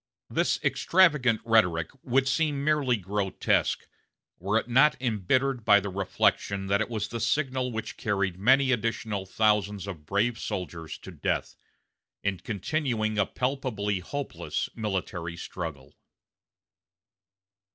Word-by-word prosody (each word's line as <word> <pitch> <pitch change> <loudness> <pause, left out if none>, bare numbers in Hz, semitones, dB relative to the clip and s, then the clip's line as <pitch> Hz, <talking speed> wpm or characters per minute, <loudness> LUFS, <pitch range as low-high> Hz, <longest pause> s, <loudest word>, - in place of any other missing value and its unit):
This - - +1
extravagant 150 -11 +3
rhetoric 90 -8 +3
would 135 +1 +1
seem 145 -1 +1
merely 145 -5 +2
grotesque, 100 0 0 0.5
were 100 +5 +1
it 115 - -1
not 130 +4 +4
embittered 125 +2 0
by 105 -1 +6
the 100 0 -4
reflection 95 +1 0
that 100 +2 +1
it 110 - -1
was 110 -3 -2
the 115 - -4
signal 130 0 0
which 110 -1 -5
carried 95 -4 -1
many 130 +5 +4
additional 110 -4 -1
thousands 105 -1 +1
of 80 -7 -8
brave 110 +4 +1
soldiers 85 -6 -5
to - - -11
death, - - -2 0.7
in 100 -2 -1
continuing 110 - -1
a 100 - +3
palpably 125 -7 -1
hopeless 140 +10 -4
military 90 -6 -3
struggle. 75 -6 -7
110 Hz, 120 wpm, -27 LUFS, 95-130 Hz, 0.7 s, by